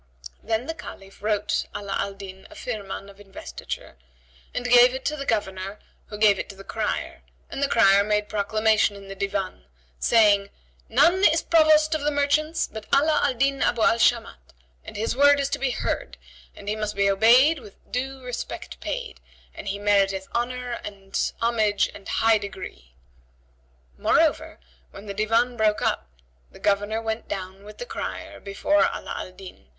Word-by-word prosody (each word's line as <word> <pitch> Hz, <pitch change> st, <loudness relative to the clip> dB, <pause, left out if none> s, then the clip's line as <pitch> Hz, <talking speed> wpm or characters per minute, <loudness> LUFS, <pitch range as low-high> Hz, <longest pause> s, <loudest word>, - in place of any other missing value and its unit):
Then 225 Hz, +2 st, -1 dB
the 325 Hz, -, -3 dB
Caliph 195 Hz, -10 st, -11 dB
wrote 210 Hz, -1 st, 0 dB
Ala 200 Hz, -1 st, -4 dB
al 200 Hz, 0 st, -2 dB
Din 190 Hz, -1 st, -10 dB
a 315 Hz, -, -14 dB
Firman[FN#78] 205 Hz, -8 st, -6 dB
of 195 Hz, -, -20 dB
investiture 195 Hz, -1 st, -8 dB, 0.5 s
and 245 Hz, -, -4 dB
gave 245 Hz, +1 st, +7 dB
it 260 Hz, -, -7 dB
to 300 Hz, -, 0 dB
the 275 Hz, -2 st, -6 dB
Governor 195 Hz, -2 st, -2 dB, 0.3 s
who 210 Hz, -, -8 dB
gave 210 Hz, -2 st, +4 dB
it -, -, -5 dB
to 195 Hz, -, -9 dB
the 195 Hz, -, -12 dB
crier,[FN#79] -, -, -3 dB, 0.3 s
and -, -, -5 dB
the 280 Hz, -, +3 dB
crier 200 Hz, -5 st, +5 dB
made 210 Hz, 0 st, 0 dB
proclamation 215 Hz, 0 st, +1 dB
in 200 Hz, -1 st, -12 dB
the -, -, -5 dB
Divan 195 Hz, -, -3 dB, 0.3 s
saying, 205 Hz, -3 st, +4 dB, 0.4 s
"None 370 Hz, +4 st, +4 dB
is 320 Hz, +1 st, +4 dB
Provost 310 Hz, -1 st, +4 dB
of 310 Hz, -, -1 dB
the 295 Hz, -, +1 dB
merchants 300 Hz, +2 st, +1 dB
but 220 Hz, -1 st, -9 dB
Ala 300 Hz, +2 st, +4 dB
al 270 Hz, -3 st, +1 dB
Din 275 Hz, +2 st, +1 dB
Abu 235 Hz, -2 st, +2 dB
al 230 Hz, -, +4 dB
Shamat, 220 Hz, -, 0 dB, 0.3 s
and -, -, -9 dB
his 225 Hz, +3 st, -1 dB
word 285 Hz, +1 st, +5 dB
is 280 Hz, 0 st, 0 dB
to -, -, -2 dB
be 270 Hz, -, 0 dB
heard, 245 Hz, -, -3 dB, 0.4 s
and 200 Hz, -, -12 dB
he 210 Hz, -, 0 dB
must 215 Hz, -1 st, -3 dB
be 200 Hz, 0 st, +2 dB
obeyed 240 Hz, +10 st, +5 dB
with 210 Hz, -5 st, -14 dB, 0.2 s
due 265 Hz, +1 st, -3 dB
respect 250 Hz, -1 st, -6 dB
paid, -, -, -5 dB, 0.3 s
and -, -, -9 dB
he 200 Hz, 0 st, -2 dB
meriteth 195 Hz, -2 st, +1 dB
homage 245 Hz, 0 st, -3 dB
and 195 Hz, -1 st, -3 dB
honour 225 Hz, -3 st, +2 dB, 0.2 s
and 200 Hz, -, -10 dB
high 225 Hz, -1 st, +3 dB
degree!" 185 Hz, -, -9 dB, 1.0 s
Moreover, -, -, +2 dB, 0.3 s
when 205 Hz, -, -12 dB
the 200 Hz, -, -5 dB
Divan 225 Hz, +4 st, +1 dB
broke 215 Hz, -1 st, +2 dB
up, -, -, 0 dB, 0.4 s
the -, -, -14 dB
Governor 205 Hz, +2 st, 0 dB
went 220 Hz, 0 st, -3 dB
down 190 Hz, 0 st, -6 dB
with 210 Hz, +1 st, -12 dB
the -, -, -6 dB
crier -, -, -6 dB
before 205 Hz, +10 st, 0 dB
Ala -, -, -4 dB
Al -, -, -6 dB
Din!" 185 Hz, -, -13 dB
215 Hz, 175 wpm, -24 LUFS, 200-255 Hz, 1.0 s, gave